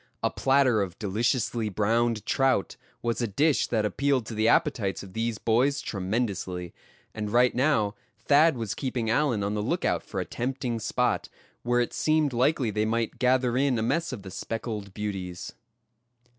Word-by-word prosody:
A - - +2
platter 135 -5 +3
of 90 -3 -4
deliciously 110 +2 0
browned 110 +2 +1
trout 135 -7 +1 0.3
was 120 0 -1
a 120 - +1
dish 145 +9 +2
that 110 -3 0
appealed 135 +4 +1
to 110 - -6
the 110 +1 +1
appetites 115 - +1
of 95 -2 -12
these 115 0 -1
boys 125 +7 +2
tremendously, 95 -3 -3 0.4
and 105 -1 -4
right 120 +3 +4
now 125 -6 +2 0.2
Thad 150 0 +4
was 115 -4 -3
keeping 120 -4 -2
Allan 120 -5 +1
on 100 +1 -1
the 105 - -1
lookout - - 0
for - - -6
a - - -2
tempting 125 -1 -3
spot, 110 - 0 0.3
where 120 0 +2
it 120 - -2
seemed 155 -3 +1
likely 125 -1 +2
they 105 +1 0
might 115 +2 -1
gather 125 -1 +2
in 135 -1 +2
a 110 - 0
mess 165 +8 0
of 115 -7 -7
the 95 - -9
speckled 110 -1 -5
beauties. 95 -4 -5
115 Hz, 170 wpm, -27 LUFS, 105-130 Hz, 0.4 s, right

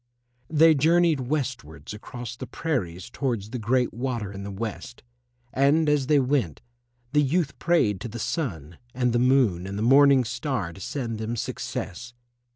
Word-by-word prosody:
They 160 +1 +6
journeyed 165 +1 +3
westwards 120 - -4
across 120 +2 -8
the - - -7
prairies 95 - -3
towards 115 -6 -3
the 125 - -4
Great 125 +3 +1
Water 120 -4 -3
in 100 0 -7
the 100 - -6
West, 110 +4 -6 0.5
and 145 +4 +3
as 145 -3 +2
they 150 -1 +4
went, 125 - 0 0.5
the 150 - +5
youth 150 +2 0
prayed 110 - +2
to - - -4
the 115 +1 -7
Sun 90 - -4 0.2
and 125 -2 +1
the 120 - +2
Moon 120 -9 +3
and 100 +1 -5
the 105 - -1
Morning 135 +1 +6
Star 125 - -3
to 95 - -12
send 115 -1 -4
them 110 +2 -3
success. 120 +1 -5
125 Hz, 160 wpm, -25 LUFS, 105-140 Hz, 0.5 s, They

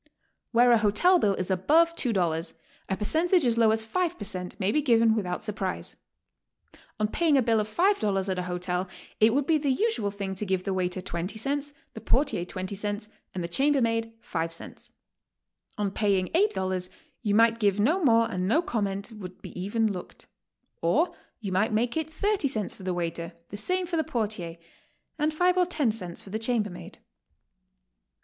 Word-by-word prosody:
Where 245 +1 +5
a 235 - +6
hotel 220 - +4
bill 200 -8 +2
is 185 +1 -2
above 315 - +4
$2, 175 - 0 0.4
a 190 - 0
percentage 325 - +2
as 235 -1 +2
low 225 -1 +5
as 220 0 +1
five 355 +8 -1
per 205 - -6
cent, 185 -1 -4
may 195 0 +1
be 300 - +2
given 230 -5 +4
without 180 -5 -2
surprise. 195 -3 -3 1.0
On 215 - +2
paying 310 +5 +2
a - - +5
bill 225 -1 +3
of 210 0 -2
$5 215 - +1
at 185 -1 -1
a 180 0 -4
hotel 180 +1 -2 0.3
it 220 +1 +6
would 275 +3 +1
be 315 0 +3
the 290 -1 -1
usual 400 - +1
thing 200 -1 -4
to 190 - -5
give 185 -1 0
the 195 - -1
waiter 185 0 -1
twenty 180 +3 -4
cents, 285 +5 -2 0.2
the 220 - -8
portier 265 -9 +1
twenty 185 +2 -5
cents, 205 +1 -4 0.3
and 180 - -2
the - - -2
chambermaid 230 0 +1
five 165 -4 -3
cents. 165 - -10 0.9
On 205 -2 -1
paying 195 -3 +1
$8 190 - 0 0.3
you 205 -4 +1
might 230 +1 +4
give 205 -2 +2
no 320 - +2
more 230 -4 +5
and 185 0 -1
no 310 - +3
comment 200 - -2
would 190 -4 -9
be - - -7
even 205 +4 0
looked; 180 - -9 0.6
or 275 - +2 0.2
you 205 -5 -5
might 205 +4 +1
make 235 +2 +1
it 320 -1 -1
thirty 395 0 0
cents 215 -7 -2
for - - -14
the 185 -1 -2
waiter, 170 -1 -3 0.2
the - - -7
same 365 - -1
for 340 -1 -2
the 315 - +2
portier, 205 - -3 0.6
and 300 +1 +2
five 360 +3 +2
or 360 - +4
ten 300 -9 +1
cents 180 -6 -5
for 195 - -11
the 220 - -2
chambermaid. 220 -5 -2
215 Hz, 185 wpm, -27 LUFS, 190-275 Hz, 1.0 s, a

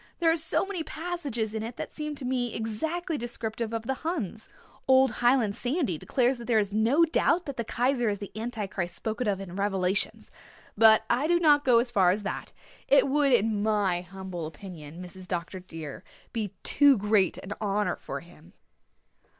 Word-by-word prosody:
"There 330 -2 +3
are - - +3
so 320 +2 +1
many 390 -3 -4
passages 305 -10 -4
in 220 - -2
it 230 +2 -5
that - - -6
seem 300 -1 -4
to 275 - -6
me 250 -2 -1
exactly 315 +9 -2
descriptive 230 -1 -4
of 225 -1 -3
the 265 - -1
Huns. 250 - -4 0.4
Old 260 -1 +5
Highland 240 -4 +3
Sandy 250 - -1
declares 255 0 +1
that 235 - -8
there 230 -2 +2
is 205 -1 +1
no 235 +10 +4
doubt 335 +2 +2
that 280 - -5
the 235 - -2
Kaiser 245 +1 +1
is 205 - -1
the 200 0 -8
Anti 225 -1 -3
Christ 175 -3 -4
spoken 220 +2 -3
of 200 -2 0
in 185 -2 -8
Revelations, 195 -1 -1 0.4
but 220 0 +6
I 270 +7 +1
do 345 +1 +3
not 295 -3 +5
go 245 -3 +5
as 240 +1 +1
far 190 -6 +4
as 200 +3 0
that. - - -4 0.4
It 275 0 +5
would, 285 0 +3
in 220 -3 +2
my 205 -5 +1
humble 180 -2 -6
opinion, 165 0 -10
Mrs. 185 +1 -10
Dr. 180 +1 -4
dear, 165 -5 -8 0.3
be 210 -4 -3
too 285 -3 +5
great 205 -2 +2
an 200 - -6
honour 210 0 0
for - - -6
him." - - -18
225 Hz, 190 wpm, -28 LUFS, 195-270 Hz, 0.4 s, but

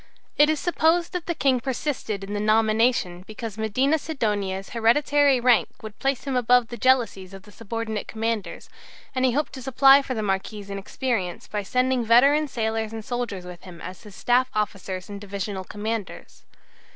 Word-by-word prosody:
It 295 +1 +5
is 310 -1 +1
supposed 340 -1 +1
that 355 -2 -4
the 340 - -1
King 265 -4 +2
persisted 240 -5 -3
in 200 +1 -6
the 205 - -1
nomination 215 -3 +2
because 215 -1 -7
Medina 260 +8 +1
Sidonia's 205 -10 -2
hereditary 275 +4 +3
rank 245 -2 +3
would 215 -1 -9
place 270 -1 -1
him 270 -1 -3
above 245 -1 +3
the 240 - -6
jealousies 235 -7 +1
of 195 - -12
the 210 - -16
subordinate 220 0 -5
commanders, 225 -2 -3 0.5
and 260 -1 +1
he 250 - +2
hoped 295 +3 -1
to 265 - -7
supply 270 +2 +6
for 265 -2 -4
the 215 - -2
Marquis's 200 +1 -3
inexperience 200 -1 -3
by 210 -1 -3
sending 250 +4 +1
veteran 275 +7 +5
sailors 220 -3 -2
and 220 -1 -7
soldiers 240 -7 -4
with 180 -1 -10
him 180 -3 -12
as 185 0 -9
his 210 -4 -13
staff 250 +1 +2
officers 195 -3 -3
and 200 -1 -8
divisional 200 -1 -5
commanders. 210 +1 -6
225 Hz, 175 wpm, -24 LUFS, 205-260 Hz, 0.5 s, supply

